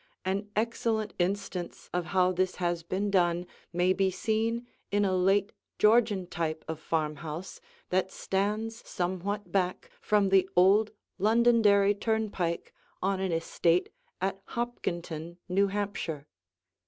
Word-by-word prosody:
An 200 Hz, +2 st, -1 dB
excellent 220 Hz, -2 st, 0 dB
instance 180 Hz, -1 st, -2 dB
of 175 Hz, -1 st, 0 dB
how 185 Hz, +1 st, +3 dB
this 185 Hz, 0 st, 0 dB
has 175 Hz, -1 st, -1 dB
been 190 Hz, +4 st, -2 dB
done 175 Hz, -2 st, +2 dB, 0.3 s
may 180 Hz, +2 st, +3 dB
be 195 Hz, 0 st, +2 dB
seen 225 Hz, +5 st, -1 dB, 0.3 s
in 205 Hz, 0 st, +3 dB
a 190 Hz, -1 st, +1 dB
late 195 Hz, +2 st, +3 dB, 0.3 s
Georgian 210 Hz, -3 st, +4 dB
type 160 Hz, -2 st, -3 dB
of 160 Hz, -1 st, -4 dB
farmhouse 160 Hz, -, -3 dB, 0.3 s
that 185 Hz, +1 st, +2 dB
stands 210 Hz, +5 st, -1 dB
somewhat 185 Hz, +2 st, -2 dB
back 185 Hz, -2 st, -1 dB
from 205 Hz, -2 st, +3 dB
the 190 Hz, -1 st, +4 dB
old 200 Hz, +4 st, +5 dB, 0.3 s
Londonderry 215 Hz, -2 st, +5 dB
turnpike 205 Hz, -5 st, -1 dB, 0.3 s
on 195 Hz, 0 st, +1 dB
an 190 Hz, -1 st, -1 dB
estate 165 Hz, +1 st, +1 dB, 0.3 s
at 195 Hz, +1 st, -2 dB
Hopkinton, 170 Hz, -8 st, -4 dB
New 195 Hz, +2 st, +3 dB
Hampshire. 195 Hz, -7 st, -3 dB
190 Hz, 125 wpm, -29 LUFS, 175-205 Hz, 0.3 s, old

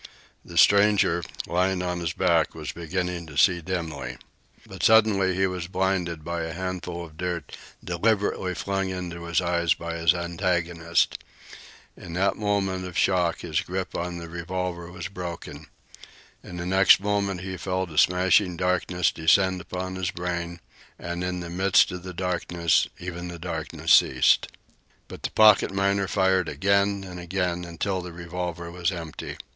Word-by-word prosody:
The -, -, -9 dB
stranger, 100 Hz, -4 st, +5 dB, 0.2 s
lying 90 Hz, +1 st, 0 dB
on 90 Hz, -1 st, -2 dB
his 85 Hz, -3 st, -2 dB
back, -, -, +2 dB
was -, -, -5 dB
beginning 90 Hz, 0 st, -3 dB
to 75 Hz, -3 st, -9 dB
see 90 Hz, +2 st, +4 dB
dimly. 80 Hz, -8 st, -4 dB, 0.5 s
But -, -, -10 dB
suddenly 105 Hz, -4 st, +4 dB
he 95 Hz, +1 st, +2 dB
was 90 Hz, -2 st, -3 dB
blinded 90 Hz, -4 st, -1 dB
by 85 Hz, +1 st, -3 dB
a 80 Hz, 0 st, -4 dB
handful 90 Hz, -1 st, -4 dB
of 80 Hz, -1 st, -16 dB
dirt 85 Hz, -4 st, -4 dB, 0.3 s
deliberately 95 Hz, 0 st, 0 dB
flung 95 Hz, +2 st, -2 dB
into 85 Hz, -2 st, -5 dB
his 85 Hz, +1 st, +1 dB
eyes 85 Hz, -2 st, +1 dB
by 85 Hz, 0 st, -5 dB
his 85 Hz, +1 st, +3 dB
antagonist. 85 Hz, -1 st, 0 dB, 0.7 s
In 85 Hz, -3 st, -10 dB
that 95 Hz, +2 st, +1 dB
moment 100 Hz, -3 st, -1 dB
of 90 Hz, -2 st, -6 dB
shock 90 Hz, -3 st, +2 dB
his 80 Hz, -3 st, -1 dB
grip 95 Hz, +1 st, -4 dB
on 85 Hz, 0 st, -3 dB
the 85 Hz, -1 st, -7 dB
revolver 85 Hz, +1 st, -4 dB
was 85 Hz, -1 st, -6 dB
broken. 85 Hz, -5 st, -7 dB, 0.8 s
In 90 Hz, -, -9 dB
the 85 Hz, -, -4 dB
next 95 Hz, +1 st, +6 dB
moment 100 Hz, -2 st, -1 dB
he 95 Hz, 0 st, -5 dB
felt 95 Hz, -1 st, -3 dB
a 75 Hz, -, -9 dB
smashing 90 Hz, 0 st, +3 dB
darkness 90 Hz, -1 st, +1 dB
descend 95 Hz, +3 st, +3 dB
upon 95 Hz, +2 st, -5 dB
his 95 Hz, -1 st, -1 dB
brain, 85 Hz, -1 st, -4 dB, 0.4 s
and 85 Hz, +1 st, -4 dB
in 90 Hz, 0 st, -2 dB
the 85 Hz, -, -6 dB
midst 95 Hz, +2 st, +4 dB
of 90 Hz, -1 st, -6 dB
the 90 Hz, +1 st, -7 dB
darkness 85 Hz, -2 st, +1 dB
even 90 Hz, 0 st, -6 dB
the 85 Hz, -1 st, -7 dB
darkness 85 Hz, +1 st, -1 dB
ceased. -, -, +5 dB, 0.6 s
But -, -, -10 dB
the -, -, -2 dB
pocket 110 Hz, -3 st, +5 dB
miner 100 Hz, 0 st, +1 dB
fired 95 Hz, -3 st, +2 dB
again 100 Hz, 0 st, +1 dB
and 90 Hz, -2 st, -8 dB
again, 90 Hz, 0 st, -2 dB
until 90 Hz, +3 st, -3 dB
the 90 Hz, 0 st, -8 dB
revolver 85 Hz, 0 st, -5 dB
was 90 Hz, +1 st, -1 dB
empty. 85 Hz, -4 st, -7 dB
90 Hz, 160 wpm, -25 LUFS, 85-95 Hz, 0.8 s, next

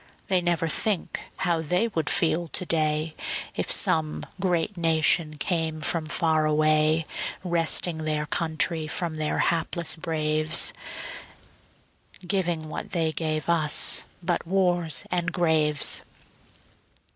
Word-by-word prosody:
They 185 Hz, -2 st, +2 dB
never 170 Hz, -1 st, 0 dB
think 195 Hz, +3 st, +1 dB
how 170 Hz, -3 st, 0 dB
they 180 Hz, +8 st, +1 dB
would 160 Hz, -7 st, -2 dB
feel 170 Hz, +1 st, +2 dB
to 180 Hz, -, -4 dB
day, 155 Hz, -1 st, 0 dB, 0.4 s
If -, -, -2 dB
some 155 Hz, -1 st, +1 dB
great 180 Hz, +1 st, 0 dB
nation 160 Hz, -2 st, +2 dB
came 160 Hz, -1 st, -1 dB
from 155 Hz, +1 st, +1 dB
far 155 Hz, -1 st, +2 dB
away, 155 Hz, +1 st, +3 dB, 0.4 s
Wresting 170 Hz, -1 st, +2 dB
their 155 Hz, -1 st, -1 dB
country 160 Hz, 0 st, -1 dB
from 160 Hz, 0 st, -1 dB
their 155 Hz, -1 st, -1 dB
hapless 170 Hz, 0 st, 0 dB
braves, 155 Hz, -2 st, +1 dB, 1.5 s
Giving 175 Hz, -4 st, -1 dB
what 155 Hz, -, -7 dB
they 165 Hz, -3 st, +1 dB
gave 155 Hz, -2 st, -2 dB
us 160 Hz, -3 st, +2 dB, 0.2 s
but 175 Hz, -1 st, -1 dB
wars 175 Hz, -3 st, +1 dB
and 180 Hz, 0 st, 0 dB
graves. 155 Hz, -4 st, +2 dB
160 Hz, 115 wpm, -25 LUFS, 155-175 Hz, 1.5 s, away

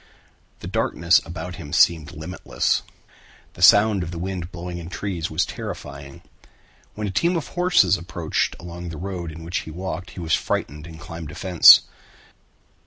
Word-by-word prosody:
The -, -, -7 dB
darkness 85 Hz, 0 st, +2 dB
about 85 Hz, +1 st, -7 dB
him 70 Hz, -, -9 dB
seemed 80 Hz, +1 st, +3 dB
limitless. 80 Hz, -5 st, -2 dB, 0.7 s
The -, -, -12 dB
sound 105 Hz, -1 st, +6 dB
of 85 Hz, -, -4 dB
the 85 Hz, -, -6 dB
wind 90 Hz, 0 st, -5 dB
blowing 85 Hz, 0 st, -6 dB
in 85 Hz, 0 st, -8 dB
trees 90 Hz, -3 st, -4 dB
was 80 Hz, +3 st, 0 dB
terrifying. 70 Hz, -4 st, -8 dB, 0.7 s
When 105 Hz, -, -4 dB
a 100 Hz, -, -3 dB
team 170 Hz, -, +1 dB
of 165 Hz, -, -3 dB
horses 180 Hz, -, +3 dB
approached 85 Hz, -1 st, -2 dB
along 85 Hz, 0 st, -8 dB
the 80 Hz, -, -7 dB
road 90 Hz, -2 st, -5 dB
in 80 Hz, +1 st, -10 dB
which 85 Hz, +2 st, -2 dB
he -, -, -9 dB
walked 90 Hz, +2 st, -6 dB
he -, -, -4 dB
was 80 Hz, -2 st, -2 dB
frightened 75 Hz, +3 st, -2 dB
and 80 Hz, -1 st, -11 dB
climbed 80 Hz, 0 st, -8 dB
a 75 Hz, -, -10 dB
fence. 90 Hz, -3 st, +8 dB
85 Hz, 170 wpm, -23 LUFS, 80-95 Hz, 0.7 s, fence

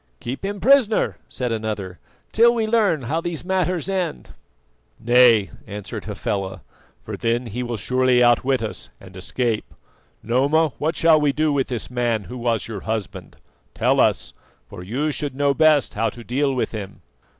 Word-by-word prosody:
"Keep 130 Hz, +8 st, -6 dB
him 200 Hz, +1 st, -3 dB
prisoner," 245 Hz, -2 st, +3 dB
said 125 Hz, -2 st, -3 dB
another, 105 Hz, -5 st, -4 dB, 0.3 s
"till 235 Hz, +2 st, +5 dB
we 225 Hz, -2 st, 0 dB
learn 215 Hz, -, +2 dB
how 155 Hz, +8 st, -1 dB
these 175 Hz, -1 st, -4 dB
matters 185 Hz, -3 st, -1 dB
end." 185 Hz, -, -3 dB, 0.7 s
"Nay," 120 Hz, -3 st, +5 dB, 0.2 s
answered 105 Hz, -1 st, -7 dB
Hafela, 95 Hz, -2 st, -4 dB, 0.4 s
"for -, -, -6 dB
then 120 Hz, +2 st, -1 dB
he 115 Hz, +2 st, -5 dB
will 120 Hz, -2 st, -3 dB
surely 125 Hz, +3 st, +2 dB
outwit 125 Hz, +1 st, +3 dB
us 105 Hz, -, -5 dB
and 95 Hz, -1 st, -14 dB
escape. 110 Hz, +4 st, -3 dB, 0.5 s
Noma, 140 Hz, +7 st, +2 dB
what 160 Hz, +3 st, -1 dB
shall 160 Hz, -2 st, +4 dB
we 145 Hz, -1 st, +3 dB
do 155 Hz, +1 st, 0 dB
with 135 Hz, -2 st, 0 dB
this 125 Hz, -1 st, -5 dB
man 120 Hz, -3 st, 0 dB
who 125 Hz, +5 st, -8 dB
was 115 Hz, -2 st, -1 dB
your 110 Hz, -3 st, -5 dB
husband? 110 Hz, -3 st, -5 dB, 0.4 s
Tell -, -, +2 dB
us, -, -, +1 dB, 0.3 s
for -, -, -10 dB
you 130 Hz, +12 st, -2 dB
should 145 Hz, -2 st, -3 dB
know 140 Hz, 0 st, +2 dB
best 155 Hz, -1 st, +3 dB
how 115 Hz, +2 st, 0 dB
to 120 Hz, +3 st, -11 dB
deal 135 Hz, +4 st, 0 dB
with 125 Hz, -, -1 dB
him." 100 Hz, -3 st, -8 dB
125 Hz, 165 wpm, -22 LUFS, 110-155 Hz, 0.7 s, till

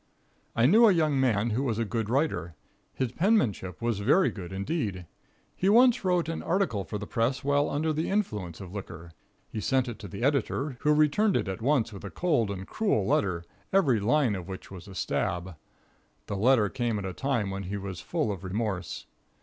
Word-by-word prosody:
I 115 Hz, -, +4 dB
knew 220 Hz, -, +7 dB
a -, -, +6 dB
young 155 Hz, -6 st, +2 dB
man 115 Hz, -3 st, +2 dB
who 115 Hz, +5 st, 0 dB
was 120 Hz, -6 st, -1 dB
a 115 Hz, -, 0 dB
good 110 Hz, 0 st, -2 dB
writer. 120 Hz, -, 0 dB, 0.4 s
His 130 Hz, -3 st, -2 dB
penmanship 125 Hz, -, +1 dB
was 115 Hz, -4 st, 0 dB
very 145 Hz, -, +3 dB
good, 90 Hz, -4 st, -8 dB
indeed. 100 Hz, -, -3 dB, 0.5 s
He 190 Hz, -, +1 dB
once 240 Hz, +2 st, +5 dB
wrote 180 Hz, -3 st, +1 dB
an 165 Hz, -, -3 dB
article 170 Hz, -, 0 dB
for 105 Hz, -, -5 dB
the 105 Hz, -, -6 dB
press 120 Hz, +6 st, -1 dB
while 145 Hz, +1 st, +2 dB
under 155 Hz, +2 st, 0 dB
the 155 Hz, +2 st, -1 dB
influence 105 Hz, -, -2 dB
of 95 Hz, -2 st, -9 dB
liquor. 85 Hz, -4 st, -8 dB, 0.4 s
He 110 Hz, -, -4 dB
sent 130 Hz, +3 st, +1 dB
it 120 Hz, -3 st, -6 dB
to 100 Hz, -, -8 dB
the 100 Hz, +5 st, -6 dB
editor, 140 Hz, 0 st, 0 dB
who 150 Hz, -, +2 dB
returned 155 Hz, +8 st, +3 dB
it -, -, -2 dB
at 95 Hz, +3 st, -4 dB
once 120 Hz, -4 st, +1 dB
with 100 Hz, -, -9 dB
a 100 Hz, -, -5 dB
cold 150 Hz, -, +1 dB
and 95 Hz, -1 st, -5 dB
cruel 195 Hz, -, 0 dB
letter, 90 Hz, -4 st, +1 dB, 0.3 s
every 145 Hz, -, +3 dB
line 120 Hz, +3 st, +2 dB
of 95 Hz, -2 st, -5 dB
which 95 Hz, 0 st, -8 dB
was 95 Hz, +1 st, -10 dB
a 95 Hz, -, -10 dB
stab. 90 Hz, 0 st, -2 dB, 0.7 s
The 100 Hz, -, -4 dB
letter 110 Hz, +1 st, +4 dB
came 120 Hz, 0 st, -1 dB
at 100 Hz, -, -4 dB
a 95 Hz, -, -4 dB
time 120 Hz, -4 st, -1 dB
when 95 Hz, 0 st, -4 dB
he 100 Hz, +3 st, -3 dB
was 95 Hz, -3 st, -6 dB
full 110 Hz, -, -1 dB
of 95 Hz, -2 st, -6 dB
remorse. 95 Hz, -2 st, -3 dB
115 Hz, 205 wpm, -28 LUFS, 100-150 Hz, 0.7 s, knew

